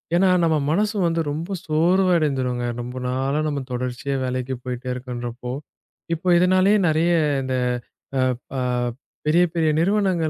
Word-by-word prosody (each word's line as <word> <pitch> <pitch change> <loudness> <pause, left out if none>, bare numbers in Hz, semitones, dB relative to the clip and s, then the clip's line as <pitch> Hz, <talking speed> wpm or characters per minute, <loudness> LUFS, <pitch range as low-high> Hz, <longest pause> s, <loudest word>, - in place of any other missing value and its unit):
ஏன்னா, 190 +1 +4
நம்ம 160 -2 +3
மனசும் 205 +2 +1
வந்து 165 0 0
ரொம்ப 170 +6 -3
சோர்வு 175 +5 +3
அடைந்துரும்ங்க. 130 -5 0 0.2
ரொம்ப 125 +1 -7
நாளா 135 +3 0
நம்ம 145 -2 -2
தொடர்ச்சியா 125 +2 -2
வேலைக்குப் 130 0 -3
போயிட்டு 125 0 -5
இருக்கன்றப்போ, 125 -1 -5 0.6
இப்போ 170 +3 -4
இதனாலயே 185 +3 +4
நிறைய 165 +3 +2 0.3
இந்த 130 0 -2 0.6
ஆ - - +2 0.3
ப - - -6 0.7
பெரிய, 170 +4 +4
பெரிய 160 -2 +2
நிறுவனங்கள் 185 -3 +2
155 Hz, 135 wpm, -23 LUFS, 125-175 Hz, 0.7 s, ஏன்னா